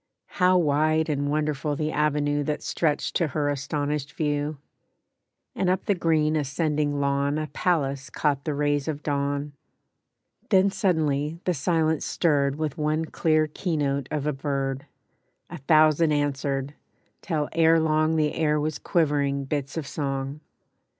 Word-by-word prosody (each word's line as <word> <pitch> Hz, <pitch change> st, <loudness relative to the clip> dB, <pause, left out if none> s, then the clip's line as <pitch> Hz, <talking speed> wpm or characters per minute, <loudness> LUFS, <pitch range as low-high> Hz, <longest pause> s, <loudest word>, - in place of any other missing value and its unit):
How 180 Hz, 0 st, +5 dB
wide 155 Hz, 0 st, +2 dB
And 145 Hz, -1 st, -1 dB
wonderful 150 Hz, -1 st, -1 dB
the 155 Hz, +1 st, -2 dB
avenue 145 Hz, -1 st, +1 dB
That 150 Hz, +1 st, -3 dB
stretched 155 Hz, -3 st, -1 dB
to 170 Hz, -, +1 dB
her 145 Hz, +1 st, -1 dB
astonished 145 Hz, 0 st, -2 dB
view! 145 Hz, -1 st, -1 dB, 1.0 s
And 185 Hz, -1 st, 0 dB
up 185 Hz, +1 st, 0 dB
the 205 Hz, -, +3 dB
green 160 Hz, -3 st, +1 dB
ascending 150 Hz, 0 st, 0 dB
lawn 140 Hz, +1 st, +1 dB
A 155 Hz, -, -2 dB
palace 140 Hz, -3 st, -1 dB
caught 140 Hz, -2 st, 0 dB
the 150 Hz, -3 st, -2 dB
rays 145 Hz, 0 st, 0 dB
of 150 Hz, -2 st, -3 dB
dawn. 145 Hz, 0 st, -2 dB, 1.0 s
Then 195 Hz, -1 st, +4 dB
suddenly 155 Hz, -6 st, 0 dB
the 180 Hz, -, +1 dB
silence 160 Hz, +1 st, +1 dB
stirred 140 Hz, -5 st, +1 dB
With 155 Hz, -1 st, -3 dB
one 155 Hz, +1 st, 0 dB
clear 155 Hz, -1 st, +1 dB
keynote 145 Hz, -4 st, -2 dB
of 150 Hz, -2 st, -2 dB
a 150 Hz, -, 0 dB
bird; 135 Hz, -1 st, -3 dB, 0.6 s
A 175 Hz, -, -7 dB
thousand 155 Hz, +2 st, +4 dB
answered, 140 Hz, -1 st, -1 dB, 0.5 s
till 155 Hz, -5 st, -1 dB
ere 165 Hz, 0 st, +4 dB
long 155 Hz, 0 st, +2 dB
The 155 Hz, -1 st, +1 dB
air 150 Hz, -2 st, +1 dB
was 155 Hz, 0 st, -2 dB
quivering 145 Hz, -5 st, 0 dB
bits 140 Hz, +1 st, -3 dB
of 160 Hz, -, -3 dB
song. 135 Hz, 0 st, -3 dB
150 Hz, 145 wpm, -25 LUFS, 140-155 Hz, 1.0 s, How